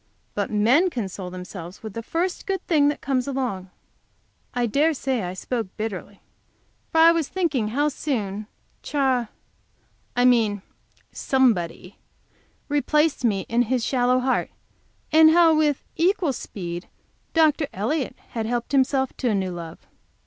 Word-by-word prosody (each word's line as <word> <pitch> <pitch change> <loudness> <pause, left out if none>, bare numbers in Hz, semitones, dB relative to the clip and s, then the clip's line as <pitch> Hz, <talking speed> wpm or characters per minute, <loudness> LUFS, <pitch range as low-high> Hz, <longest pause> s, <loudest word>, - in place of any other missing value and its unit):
But 205 -1 -2
men 240 - +3
console 195 - -5
themselves 180 0 -9
with 220 -3 -6
the 230 - -4
first 345 +9 -2
good 385 -2 -2
thing 300 -4 +3
that 290 - -1
comes 260 -2 -1
along." 245 -9 -3 0.8
I 245 -1 0
dare 295 +7 +2
say 260 -3 -1
I 180 0 -4
spoke 230 +2 -3
bitterly, 205 -2 -5 0.7
for 320 - +4
I 330 +1 +8
was 330 -4 0
thinking 305 - 0
how 285 +7 +1
soon 215 -9 -3 0.3
Ch, - - -8
I 260 -4 +2 1.0
mean 220 -5 +3 0.5
somebody, 205 -9 0 0.7
replaced 300 0 +1
me 205 -5 +2
in 235 +1 +2
his 255 -3 +1
shallow 250 -1 +2
heart, 260 0 0 0.6
and 315 0 +7
how, 325 -1 +5
with 300 -3 +1
equal 345 -3 +2
speed, 175 -6 -6 0.5
Dr. 310 -2 +3
Elliott 250 +8 -2
had 225 -2 -3
helped 240 +1 -2
himself 265 -1 +2
to 250 - 0
a 215 - +1
new 190 -2 -1
love. 170 -2 -8
250 Hz, 140 wpm, -24 LUFS, 205-295 Hz, 1.0 s, I